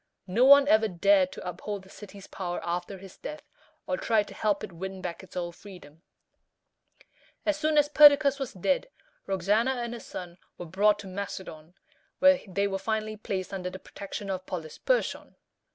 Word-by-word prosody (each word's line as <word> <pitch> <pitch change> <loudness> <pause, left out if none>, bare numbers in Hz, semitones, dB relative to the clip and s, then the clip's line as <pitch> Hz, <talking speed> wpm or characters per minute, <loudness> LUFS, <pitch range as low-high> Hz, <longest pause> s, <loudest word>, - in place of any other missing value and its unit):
No 225 +8 +3
one 280 +1 +8
ever 220 -3 +4
dared 190 0 +3
to - - -8
uphold 190 +3 -5
the 190 - -17
city's 200 -1 -11
power 175 -2 -5
after 175 +3 -3
his 190 0 -13
death, 305 +1 -8 0.4
or - - -1
tried 220 - +1
to - - -10
help 210 -2 0
it - - -6
win 190 +3 -6
back 175 -2 -5
its 190 -1 -12
old 175 -1 -4
freedom. 165 -6 -14 1.4
As 310 - +2
soon 305 0 +1
as 295 -1 +5
Perdiccas 290 -1 +7
was 270 -3 -3
dead, 280 - 0 0.4
Roxana 210 +7 +1
and 240 -1 -4
her 240 - -6
son 175 -4 -9 0.2
were 175 - -7
brought 205 +5 +3
to 200 - -10
Macedon, 185 -4 -7 0.4
where 280 -1 +6
they 200 +1 0
were 195 -1 -2
finally 215 +1 -2
placed 195 -3 -4
under 180 -1 -3
the 185 - -8
protection 200 +1 -7
of 185 -1 -5
Polysperchon. 180 - -2
200 Hz, 175 wpm, -28 LUFS, 180-235 Hz, 1.4 s, one